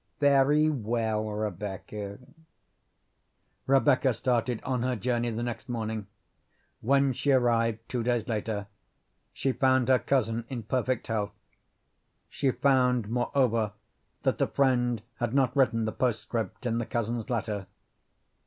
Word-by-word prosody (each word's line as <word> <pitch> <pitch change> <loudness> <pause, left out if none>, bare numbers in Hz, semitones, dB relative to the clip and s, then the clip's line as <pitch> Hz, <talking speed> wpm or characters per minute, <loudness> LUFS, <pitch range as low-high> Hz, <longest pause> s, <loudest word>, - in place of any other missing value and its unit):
"Very 145 +1 +4
well, 110 -5 0
Rebecca." 105 0 -5 1.5
Rebecca 135 -2 +4
started 120 -2 0
on 125 -2 -1
her 125 +1 0
journey 120 +2 0
the 115 +1 -3
next 120 +2 -5
morning. 110 -3 -3 0.7
When 135 +2 +3
she 145 - -2
arrived, 115 -3 +2
two 125 - -2
days 120 -1 0
later, 105 -2 -2 0.7
she 135 - -1
found 130 -1 +2
her 130 -1 +5
cousin 115 -4 0
in 120 -4 -4
perfect 125 +2 -1
health. 105 -2 -2 0.9
She 135 - 0
found, 125 -4 +2
moreover, 120 -3 +1 0.5
that - - +1
the - - +2
friend 125 -5 +1
had 120 +2 -2
not 130 -2 +2
written 115 -5 +3
the 110 - -1
postscript 115 -3 -2
in 115 -1 0
the 120 - -3
cousin's 115 0 -2
letter. 105 -5 -2
120 Hz, 125 wpm, -28 LUFS, 110-130 Hz, 1.5 s, her